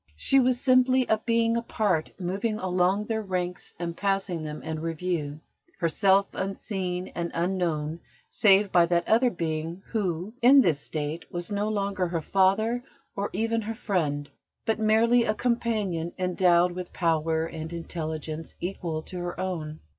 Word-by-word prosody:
She 270 Hz, -, +3 dB
was 250 Hz, -1 st, +3 dB
simply 255 Hz, 0 st, +4 dB
a 220 Hz, -2 st, +2 dB
being 230 Hz, 0 st, +1 dB
apart, 210 Hz, -8 st, 0 dB
moving 195 Hz, +5 st, -1 dB
along 185 Hz, +2 st, +1 dB
their 220 Hz, 0 st, -1 dB
ranks 180 Hz, -3 st, -4 dB
and 170 Hz, -1 st, -4 dB
passing 195 Hz, -3 st, 0 dB
them 150 Hz, -1 st, -6 dB
in 160 Hz, -1 st, -4 dB
review, 160 Hz, -2 st, -3 dB, 0.4 s
herself 190 Hz, +3 st, +3 dB
unseen 190 Hz, -2 st, -3 dB
and 170 Hz, 0 st, -3 dB
unknown 170 Hz, -3 st, -1 dB, 0.3 s
save 200 Hz, -1 st, +4 dB
by 170 Hz, -1 st, +5 dB
that 170 Hz, 0 st, +1 dB
other 235 Hz, +3 st, +4 dB
being 165 Hz, 0 st, -3 dB
who, 190 Hz, -2 st, -2 dB
in 265 Hz, +3 st, +8 dB
this 165 Hz, -, +2 dB
state, 155 Hz, +2 st, -4 dB
was 175 Hz, +2 st, -4 dB
no 205 Hz, +1 st, 0 dB
longer 200 Hz, -3 st, -1 dB
her 170 Hz, -1 st, -2 dB
father 200 Hz, +8 st, +2 dB, 0.3 s
or 200 Hz, 0 st, -2 dB
even 225 Hz, +3 st, 0 dB
her 225 Hz, +1 st, -4 dB
friend, 150 Hz, -10 st, -1 dB, 0.4 s
but 225 Hz, -1 st, 0 dB
merely 225 Hz, +2 st, +4 dB
a 215 Hz, -2 st, 0 dB
companion 215 Hz, -9 st, -1 dB
endowed 180 Hz, -1 st, +3 dB
with 180 Hz, 0 st, -7 dB
power 160 Hz, -1 st, +1 dB
and 160 Hz, 0 st, -6 dB
intelligence 160 Hz, -2 st, -5 dB
equal 170 Hz, -3 st, -3 dB
to 180 Hz, -, -7 dB
her 175 Hz, 0 st, -5 dB
own. 160 Hz, -5 st, -4 dB
185 Hz, 150 wpm, -27 LUFS, 165-215 Hz, 0.4 s, in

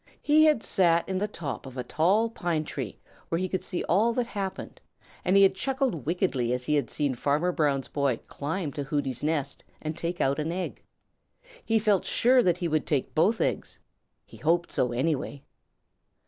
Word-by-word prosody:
He 305 Hz, +1 st, +5 dB
had 300 Hz, -7 st, +3 dB
sat 170 Hz, -4 st, +2 dB
in 190 Hz, -1 st, -1 dB
the 210 Hz, -, 0 dB
top 150 Hz, -9 st, -6 dB
of 130 Hz, 0 st, -10 dB
a 125 Hz, -, -2 dB
tall 185 Hz, -, +2 dB
pine 175 Hz, -8 st, -2 dB
tree 130 Hz, -8 st, -6 dB, 0.3 s
where 165 Hz, -, 0 dB
he 185 Hz, +2 st, -1 dB
could 185 Hz, 0 st, -3 dB
see 180 Hz, -, -3 dB
all 215 Hz, +7 st, +2 dB
that 245 Hz, 0 st, 0 dB
happened, 195 Hz, -4 st, -5 dB, 0.4 s
and 190 Hz, +2 st, +3 dB
he 195 Hz, -, +7 dB
had 195 Hz, -, +5 dB
chuckled 255 Hz, -, -1 dB
wickedly 150 Hz, -9 st, 0 dB
as 125 Hz, 0 st, -3 dB
he 150 Hz, -, 0 dB
had 145 Hz, -5 st, +1 dB
seen 145 Hz, -3 st, 0 dB
Farmer 145 Hz, +8 st, +1 dB
Brown's 140 Hz, -5 st, 0 dB
boy 140 Hz, -5 st, 0 dB
climb 155 Hz, +2 st, -3 dB
to 145 Hz, -, -4 dB
Hooty's 135 Hz, -3 st, -2 dB
nest 145 Hz, -2 st, -2 dB, 0.2 s
and 155 Hz, 0 st, -4 dB
take 170 Hz, +1 st, -3 dB
out 140 Hz, +2 st, +1 dB
an 155 Hz, +2 st, -1 dB
egg. 180 Hz, +1 st, -4 dB, 0.8 s
He 225 Hz, -, +2 dB
felt 210 Hz, -3 st, +2 dB
sure 250 Hz, +1 st, +4 dB
that 180 Hz, -6 st, +2 dB
he 175 Hz, -, -1 dB
would 155 Hz, -1 st, 0 dB
take 140 Hz, -4 st, -1 dB
both 205 Hz, +8 st, +3 dB
eggs. -, -, -2 dB, 0.5 s
He -, -, -14 dB
hoped 170 Hz, +2 st, +1 dB
so, 125 Hz, -, +1 dB
anyway. 135 Hz, +2 st, -2 dB
165 Hz, 190 wpm, -27 LUFS, 140-195 Hz, 0.8 s, he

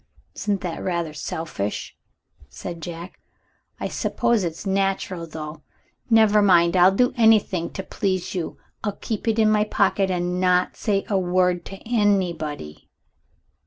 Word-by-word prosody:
"Isn't 205 Hz, -2 st, -1 dB
that 175 Hz, -4 st, -4 dB
rather 170 Hz, -4 st, -2 dB
selfish?" 150 Hz, -9 st, -4 dB, 0.5 s
said 170 Hz, -, -7 dB
Jack. 170 Hz, +2 st, -8 dB, 0.6 s
"I -, -, -2 dB
suppose 235 Hz, -3 st, 0 dB
it's 170 Hz, +3 st, -4 dB
natural, 190 Hz, -3 st, -1 dB
though. 155 Hz, -1 st, -7 dB, 0.5 s
Never 220 Hz, -2 st, +5 dB
mind, 175 Hz, -3 st, +4 dB
I'll 180 Hz, +1 st, +6 dB
do 245 Hz, +6 st, +2 dB
anything 215 Hz, -7 st, +3 dB
to 190 Hz, -, -5 dB
please 185 Hz, -1 st, -2 dB
you; 180 Hz, -4 st, -4 dB, 0.3 s
I'll 210 Hz, -2 st, -1 dB
keep 220 Hz, 0 st, -4 dB
it 225 Hz, 0 st, +2 dB
in 215 Hz, -1 st, +4 dB
my 210 Hz, -1 st, +3 dB
pocket 200 Hz, -2 st, +1 dB
and 180 Hz, 0 st, -1 dB
not 180 Hz, 0 st, +2 dB
say 200 Hz, -3 st, -1 dB
a 200 Hz, -4 st, +1 dB
word 180 Hz, -1 st, +1 dB
to 195 Hz, -, -8 dB
anybody. 175 Hz, -, -1 dB
185 Hz, 140 wpm, -23 LUFS, 170-205 Hz, 0.6 s, I'll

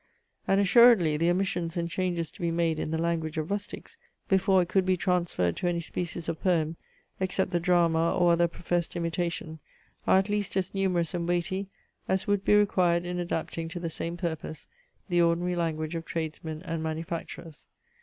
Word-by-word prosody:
And 195 Hz, -, +3 dB
assuredly 200 Hz, -5 st, +6 dB
the 165 Hz, +3 st, +2 dB
omissions 175 Hz, -2 st, -1 dB
and 170 Hz, 0 st, -1 dB
changes 175 Hz, -2 st, -2 dB
to -, -, -14 dB
be 170 Hz, -, +1 dB
made 165 Hz, -1 st, 0 dB
in -, -, -2 dB
the 160 Hz, -, -1 dB
language 160 Hz, -1 st, -1 dB
of 155 Hz, +4 st, -2 dB
rustics, 205 Hz, 0 st, -5 dB, 0.3 s
before 190 Hz, -1 st, +4 dB
it -, -, -7 dB
could 190 Hz, +1 st, +2 dB
be 185 Hz, 0 st, +1 dB
transferred 170 Hz, -, 0 dB
to 180 Hz, -, -1 dB
any 175 Hz, -1 st, 0 dB
species 170 Hz, 0 st, -4 dB
of 165 Hz, -1 st, -3 dB
poem, 165 Hz, -3 st, +1 dB, 0.4 s
except 190 Hz, 0 st, 0 dB
the 175 Hz, -, +1 dB
drama 170 Hz, -2 st, +3 dB
or 175 Hz, -1 st, +4 dB
other 170 Hz, 0 st, +3 dB
professed 175 Hz, 0 st, -2 dB
imitation, 170 Hz, -1 st, -3 dB, 0.5 s
are -, -, +6 dB
at 190 Hz, +1 st, +2 dB
least 205 Hz, -2 st, -1 dB
as 185 Hz, -1 st, -1 dB
numerous 185 Hz, -3 st, 0 dB
and 170 Hz, -1 st, -2 dB
weighty, 185 Hz, +3 st, -1 dB, 0.4 s
as 190 Hz, 0 st, 0 dB
would 205 Hz, -2 st, +1 dB
be 210 Hz, -, +4 dB
required 180 Hz, -4 st, +3 dB
in 180 Hz, 0 st, -3 dB
adapting 165 Hz, -1 st, -3 dB
to 175 Hz, -, -6 dB
the 165 Hz, -1 st, -4 dB
same 170 Hz, +2 st, -4 dB
purpose 160 Hz, -3 st, -5 dB, 0.4 s
the 175 Hz, -2 st, +2 dB
ordinary 170 Hz, +1 st, +2 dB
language 160 Hz, -2 st, -2 dB
of 165 Hz, -1 st, -3 dB
tradesmen 160 Hz, 0 st, -5 dB
and 165 Hz, -2 st, -3 dB
manufacturers. 165 Hz, 0 st, -6 dB
170 Hz, 185 wpm, -28 LUFS, 165-185 Hz, 0.5 s, assuredly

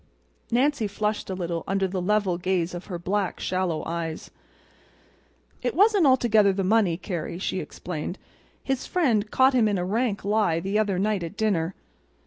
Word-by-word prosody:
Nancy 255 Hz, -1 st, +2 dB
flushed 210 Hz, +1 st, -2 dB
a 190 Hz, -, -2 dB
little 170 Hz, -2 st, -3 dB
under 195 Hz, 0 st, +1 dB
the 185 Hz, 0 st, -3 dB
level 195 Hz, -2 st, +1 dB
gaze 180 Hz, -1 st, 0 dB
of 175 Hz, +1 st, -7 dB
the 180 Hz, -4 st, -4 dB
black, 190 Hz, +2 st, -2 dB
shallow 185 Hz, -4 st, -1 dB
eyes. 165 Hz, -1 st, -4 dB, 1.3 s
"It 245 Hz, 0 st, -2 dB
wasn't 405 Hz, -3 st, +5 dB
altogether 220 Hz, -6 st, +4 dB
the 195 Hz, 0 st, -1 dB
money, 190 Hz, -4 st, +3 dB
Carrie," 175 Hz, -3 st, -4 dB
she 185 Hz, 0 st, -2 dB
explained. 175 Hz, +1 st, -5 dB, 0.5 s
"His 270 Hz, -2 st, -2 dB
friend 235 Hz, -, +1 dB
caught 260 Hz, +3 st, +4 dB
him 240 Hz, -4 st, +4 dB
in 205 Hz, -2 st, +1 dB
a 180 Hz, -, -1 dB
rank 210 Hz, 0 st, -1 dB
lie 205 Hz, -6 st, +2 dB
the 195 Hz, +5 st, 0 dB
other 205 Hz, -4 st, +1 dB
night 205 Hz, 0 st, 0 dB
at 170 Hz, +4 st, -6 dB
dinner. 190 Hz, -5 st, 0 dB
195 Hz, 165 wpm, -25 LUFS, 180-220 Hz, 1.3 s, wasn't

